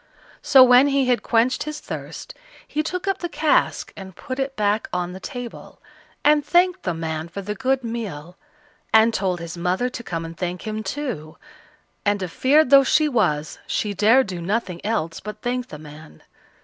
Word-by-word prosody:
So 265 -2 +7
when 250 +2 +6
he 275 -1 +2
had 250 -1 +2
quenched 240 +3 +1
his 305 0 -4
thirst, - - -8 0.3
he 300 - -1
took 365 +4 -4
up 390 -1 0
the 345 - -4
cask 315 -2 +1
and 190 -2 -10
put 260 +7 -6
it 270 0 -2
back 210 +1 0
on 180 0 -2
the 190 - -8
table, 245 0 -8 0.4
and 295 0 +4
thanked 360 +3 +2
the 175 -3 -2
man 160 0 -4
for 195 +4 -7
the 210 +2 -3
good 265 +2 0
meal, 195 -8 -6 0.6
and 220 +1 +5
told 185 -4 -1
his 170 0 -7
mother 180 +8 0
to 245 - -7
come 165 -5 -4
and 165 0 -8
thank 180 0 -4
him 215 0 -3
too, 215 - -5 0.7
and, 205 -1 +1
a - - -2
feared 270 - +3
though 275 -1 +8
she 305 +3 +3
was, 155 - 0
she 210 -1 -1
dared 225 +7 +4
do 180 -3 -6
nothing 185 -1 -2
else 170 -6 -2
but 210 0 -9
thank 250 +1 -2
the 150 - -9
man. 150 - -13
215 Hz, 190 wpm, -22 LUFS, 175-265 Hz, 0.7 s, though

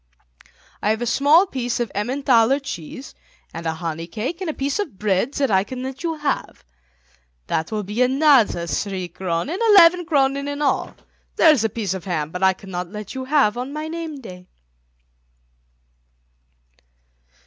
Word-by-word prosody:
I 210 - +1
have 220 +2 0
a - - -1
small 290 - +4
piece 245 -8 -3
of 235 -4 -2
Emmenthaler 250 +3 +2
cheese 265 - -8 0.4
and 165 0 -5
a 160 - -1
honey 165 0 -5
cake 250 - -5
and 365 - -2
a - - -2
piece 280 +6 -2
of 305 - -4
bread 205 +6 0
that 275 -5 0
I 190 -1 +4
can 255 +4 -7
let 265 0 -6
you 330 -1 -2
have. 295 -2 -3 0.8
That 160 - -2
will 215 -1 -2
be 210 +5 -3
another 260 - +4
three 185 +1 -3
kronen, 180 - -3
eleven 355 -4 +6
kronen 280 -3 +1
in 285 0 -4
all. 285 -3 0 0.4
There 325 - +6
is 270 -8 +2
a 225 - +1
piece 205 -4 -3
of 190 -3 -7
ham, 160 -5 -2
but 180 - -5
that 190 - +4
I 190 - +4
cannot 180 -2 -6
let 210 0 -8
you 260 -1 -5
have 265 -6 +2
on 260 +3 -5
my 305 +1 -4
name 320 -3 -6
day." 180 -5 -11
245 Hz, 170 wpm, -21 LUFS, 190-285 Hz, 0.8 s, eleven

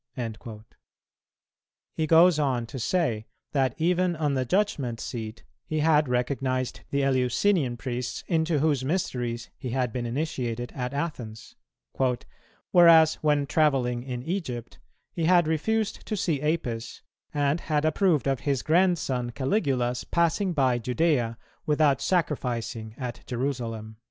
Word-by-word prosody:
"[216:2] 110 -2 -6 1.3
He 155 - -1
goes 165 +1 +6
on 130 -5 0
to 130 +3 -7
say 120 -7 0 0.2
that, 135 -4 +1
even 180 +1 +1
on 150 -3 0
the 130 -1 0
judgment 140 - 0
seat, 110 -2 -6 0.2
he 155 -1 -1
had 150 -3 +3
recognized 130 0 -1
the 140 0 0
Eleusinian 130 - +2
priests, 125 0 -4
into 160 -2 +1
whose 145 -3 +1
mysteries 125 -7 -2
he 130 - -5
had 125 -2 -1
been 120 -2 -2
initiated 120 -3 -3
at 125 +1 -4
Athens; 120 -8 -5 1.2
"whereas, 165 -3 +7
when 150 -2 +2
travelling 135 -6 +1
in 125 -1 -5
Egypt, 135 - -4 0.3
he 165 - -1
had 175 0 +5
refused 215 +7 -1
to 215 - -2
see 170 -8 0
Apis, 125 -7 -2 0.3
and 145 +1 +1
had 155 -2 0
approved 155 -1 +2
of 135 -2 +1
his 140 -3 -1
grandson 155 -8 +2
Caligula's 130 - 0
passing 170 +3 +1
by 130 -6 +2
Judæa 125 -2 0 0.3
without 150 -2 +3
sacrificing 120 - -1
at 125 -3 -5
Jerusalem." 120 -4 -3
135 Hz, 130 wpm, -26 LUFS, 120-160 Hz, 1.3 s, whereas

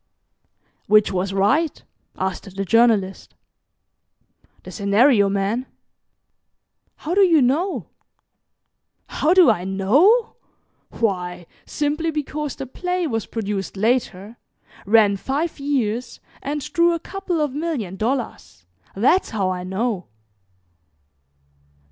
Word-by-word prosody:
'" - - -46
"Which 210 0 +4
was 190 +1 -2
right?" 265 +12 +1 0.3
asked 190 +1 -4
the 195 0 -3
Journalist. 215 -2 +2 1.3
"The - - -10
scenario 205 +1 +3
man." 200 +6 -1 1.3
"How 320 - -5
do 400 - +4
you 345 -5 +5
know?" 295 +9 0 1.2
"How 330 +4 +1
do 360 -10 +7
I 180 -5 -2
know? 275 - +2 0.5
Why 180 -5 -2 0.2
simply 305 +2 -1
because 300 -1 -4
the 270 - -6
play 360 +7 -3
was 225 -8 -3
produced 200 -3 -4
later 220 -1 -1 0.5
ran 210 -2 +4
five 290 - -3
years, 250 -4 -2 0.2
and 290 +1 -3
drew 340 0 +3
a - - -4
couple 380 -1 -4
of 295 -3 -1
million 285 - -3
dollars. 225 - -4 0.3
That's 260 - +2
how 195 -5 -1
I 180 -1 -4
know." 190 +1 -3
235 Hz, 110 wpm, -21 LUFS, 195-300 Hz, 1.3 s, do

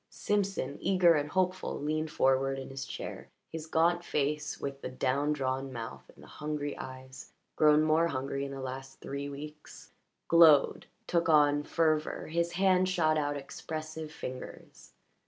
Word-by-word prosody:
Simpson, 195 -9 -1
eager 180 -3 +5
and 150 -1 0
hopeful, 185 +2 -1
leaned 155 +2 -1
forward 135 -1 +2
in 135 0 -7
his 135 0 -5
chair. - - -7 0.2
His 160 -1 -6
gaunt 170 +2 +2
face 150 -1 -1
with 140 0 -5
the - - -4
down 135 +3 0
drawn 135 -2 -2
mouth 115 - -7
and - - -16
the - - -14
hungry 150 -1 -3
eyes 130 0 -9 0.2
grown 150 0 +5
more 155 +2 +3
hungry 140 -1 -3
in 140 - -4
the 135 -1 -6
last 135 +1 -7
three 140 +1 -5
weeks 150 +2 -10 0.4
glowed, 160 -4 +6 0.2
took 170 -1 +1
on 145 -2 +5
fervour; 155 0 0
his 170 +1 0
hand 185 0 +3
shot 160 -4 +2
out 145 -1 0
expressive 155 +2 -6
fingers. 130 -5 -9
150 Hz, 155 wpm, -30 LUFS, 135-160 Hz, 0.4 s, glowed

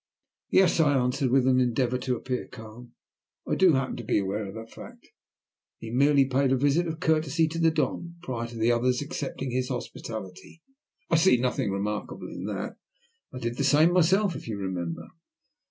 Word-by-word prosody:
"Yes," 185 -3 +4
I 145 -3 +4
answered, 125 +1 0
with 130 0 +3
an 130 -1 +4
endeavour 125 0 +1
to 125 0 -1
appear 125 +1 -4
calm, 120 +1 -12 0.5
"I - - -1
do 185 -3 +5
happen 130 -1 -1
to 120 - -6
be 110 - +1
aware 100 +1 -2
of 95 - -9
that 115 0 -9
fact. - - -13 0.7
He 115 - -8
merely 140 +2 +4
paid 135 0 +1
a 135 - +3
visit 145 +6 +2
of 160 0 -5
courtesy 160 0 +1
to 165 +1 -4
the 165 -1 +4
Don, 170 +1 -2
prior 120 -6 -4
to 120 0 -10
the 115 +2 +2
other's 125 +3 +1
accepting 140 -4 -5
his 125 +1 -1
hospitality. 115 - -7 0.5
I 165 - +5
see 165 -4 +5
nothing 125 -4 -1
remarkable 105 +2 -4
in - - -7
that. - - -5 0.5
I - - -8
did 120 -1 -4
the - - 0
same 155 +5 +4
myself, 185 +2 +3
if - - -8
you 110 -3 -4
remember." 90 -4 -4
130 Hz, 185 wpm, -27 LUFS, 115-155 Hz, 0.7 s, do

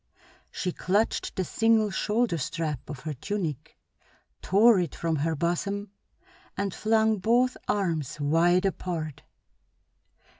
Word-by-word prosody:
She 180 - -3
clutched 200 +6 0
the 190 - 0
single 225 +1 +2
shoulder 210 -2 0
strap 150 -2 -3
of 145 -4 -7
her 155 -1 -4
tunic, 165 -1 -4 0.6
tore 210 +2 +5
it 175 -4 -2
from 165 -2 -1
her 160 +3 0
bosom, 190 +5 -2 0.7
and 200 -2 -1
flung 220 -1 +2
both 240 +5 +2
arms 165 -9 -1
wide 170 +6 +3
apart. 165 -6 -3
185 Hz, 115 wpm, -27 LUFS, 160-210 Hz, 0.7 s, tore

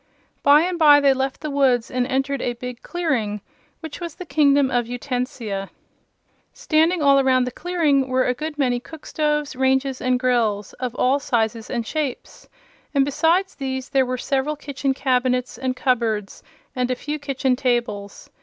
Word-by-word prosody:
By 290 +1 +6
and 350 +1 -2
by 295 -2 +7
they 280 -1 +4
left 265 0 -3
the 305 - -4
woods 260 -4 +2
and 250 0 0
entered 270 0 -1
a 245 - -1
big 250 0 -8
clearing, 290 -12 -1
in 210 - -6 0.4
which 320 -3 -7
was 340 -3 -6
the 365 - -8
Kingdom 285 -4 +3
of 245 -2 0
Utensia. 245 -5 -4 0.8
Standing 330 -6 +1
all 275 -1 +5
around 260 -1 +3
the 250 - -3
clearing 300 -4 +1
were 255 0 +1
a 250 - +1
good 305 +3 -6
many 250 -4 +1
cookstoves, 300 0 -3
ranges 265 0 +1
and 255 0 +1
grills, 225 -6 0
of 250 -2 -3
all 265 +3 +2
sizes 225 -4 -1
and 235 -3 -2
shapes, 295 -1 -5 0.5
and 275 -1 +4
besides 330 +7 +1
these 265 -2 -4
there 265 -2 +2
were 255 0 -2
several 275 +4 -1
kitchen 280 -2 -3
cabinets 250 -1 0
and 260 -1 -2
cupboards 225 -6 -1 0.3
and 250 -1 -1
a 255 - 0
few 300 +4 -5
kitchen 270 -2 0
tables. 235 -6 -2
265 Hz, 170 wpm, -22 LUFS, 250-290 Hz, 0.8 s, by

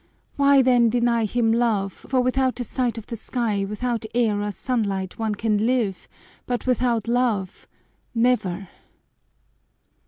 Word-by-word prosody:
Why 280 -1 +5
then 245 -2 +4
deny 235 -1 +2
him 225 +1 +1
love, 220 -5 +1
for 260 -1 -1
without 255 0 0
a - - -1
sight 240 0 -2
of 225 - -7
the 235 - -6
sky, 220 -3 -2
without 230 +2 -2
air 220 -4 +2
or 205 0 -2
sunlight, 200 -6 -2
one 220 -2 -1
can 215 0 0
live, 230 -7 -1 0.4
but 245 -1 -2
without 245 -3 +1
love 235 -6 -1 0.5
never!" 200 -6 +1
235 Hz, 135 wpm, -23 LUFS, 210-250 Hz, 0.5 s, Why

